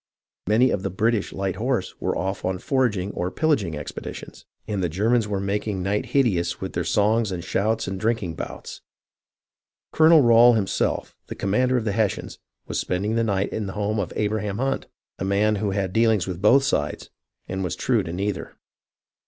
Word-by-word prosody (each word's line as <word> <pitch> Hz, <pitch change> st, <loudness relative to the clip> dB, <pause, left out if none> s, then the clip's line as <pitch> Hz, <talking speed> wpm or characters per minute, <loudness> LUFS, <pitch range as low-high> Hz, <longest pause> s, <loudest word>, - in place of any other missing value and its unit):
Many 115 Hz, +5 st, +4 dB
of 95 Hz, -, -1 dB
the 95 Hz, -, -2 dB
British 110 Hz, +3 st, 0 dB
light 95 Hz, -1 st, -3 dB
horse 115 Hz, -4 st, -1 dB
were -, -, -1 dB
off 95 Hz, +2 st, -3 dB
on 95 Hz, 0 st, -1 dB
foraging 105 Hz, -5 st, 0 dB
or 90 Hz, -1 st, -2 dB
pillaging 105 Hz, -, 0 dB
expeditions, -, -, -8 dB, 0.2 s
and 100 Hz, -3 st, -2 dB
the 90 Hz, -, 0 dB
Germans 110 Hz, +6 st, +1 dB
were 100 Hz, -2 st, -2 dB
making 100 Hz, -1 st, -2 dB
night 105 Hz, +6 st, -1 dB
hideous 120 Hz, -10 st, +1 dB
with -, -, -5 dB
their -, -, -1 dB
songs 110 Hz, +1 st, +2 dB
and 90 Hz, -2 st, -4 dB
shouts 110 Hz, +5 st, 0 dB
and 95 Hz, 0 st, -4 dB
drinking 110 Hz, -5 st, -1 dB
bouts. -, -, -7 dB, 1.1 s
Colonel 160 Hz, 0 st, +7 dB
Rail 120 Hz, +1 st, +7 dB
him 110 Hz, -4 st, +1 dB
self, 95 Hz, -, -1 dB
the -, -, -6 dB
commander 125 Hz, +6 st, +1 dB
of 115 Hz, -, -2 dB
the 105 Hz, -, +1 dB
Hessians, 105 Hz, -2 st, -1 dB, 0.3 s
was -, -, -3 dB
spending 100 Hz, +4 st, -1 dB
the 115 Hz, 0 st, +1 dB
night 100 Hz, -3 st, 0 dB
in 105 Hz, -2 st, -3 dB
the 95 Hz, -, -5 dB
home 105 Hz, +1 st, -1 dB
of 95 Hz, -, -2 dB
Abraham 105 Hz, -1 st, -1 dB
Hunt, 135 Hz, +3 st, -1 dB, 0.3 s
a -, -, -2 dB
man 105 Hz, +2 st, +2 dB
who 105 Hz, 0 st, -1 dB
had 95 Hz, -1 st, -2 dB
deal 115 Hz, +2 st, +4 dB
ings 105 Hz, -5 st, +1 dB
with 90 Hz, -1 st, -5 dB
both 130 Hz, +7 st, +5 dB
sides, 75 Hz, -, -2 dB, 0.4 s
and 95 Hz, +1 st, -3 dB
was 90 Hz, -, -2 dB
true -, -, +1 dB
to 80 Hz, -, -6 dB
neither. 100 Hz, +3 st, -3 dB
105 Hz, 190 wpm, -24 LUFS, 95-115 Hz, 1.1 s, Colonel